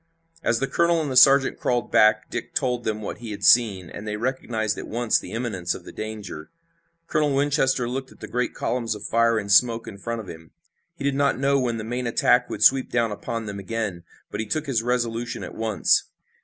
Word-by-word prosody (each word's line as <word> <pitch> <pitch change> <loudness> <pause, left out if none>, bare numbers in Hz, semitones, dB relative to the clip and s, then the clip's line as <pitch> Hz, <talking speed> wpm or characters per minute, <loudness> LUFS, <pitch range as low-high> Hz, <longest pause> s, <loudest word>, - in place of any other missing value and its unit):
As 115 - +1
the 135 - 0
colonel 170 +2 +2
and 150 -4 -2
the - - -3
sergeant 135 +1 +6
crawled 120 -1 -1
back 110 0 +4
Dick - - -5
told 125 -3 -1
them 110 -1 -2
what - - -6
he 120 -2 -8
had 105 - -7
seen, 105 -7 +4
and 105 +5 -9
they 105 0 -3
recognized 115 -3 -2
at - - -7
once 120 0 +1
the - - -10
imminence 110 -7 -2
of - - -10
the - - -9
danger. 105 -8 -7 0.6
Colonel 150 -3 +1
Winchester 135 -3 +1
looked 130 +2 -4
at - - -18
the - - -8
great 125 0 -2
columns 115 -3 -2
of 105 - -9
fire 115 +1 +2
and 100 -2 -3
smoke 115 +2 +4
in 100 -2 -9
front 115 +2 -4
of 110 - -8
him. 80 -1 -11 0.4
He 165 - -8
did 140 0 +1
not 140 0 +1
know 140 +1 +2
when 120 -3 -1
the 110 - -5
main 120 +2 -3
attack 115 - +3
would - - -2
sweep 135 0 +5
down 115 -2 +1
upon 115 +2 -4
them 100 -1 -6
again, 100 -3 -4 0.3
but 105 - -5
he 110 - -3
took 155 +7 -2
his 130 -6 0
resolution 120 0 -2
at - - -7
once. 110 -2 +1
115 Hz, 225 wpm, -24 LUFS, 110-130 Hz, 0.6 s, sergeant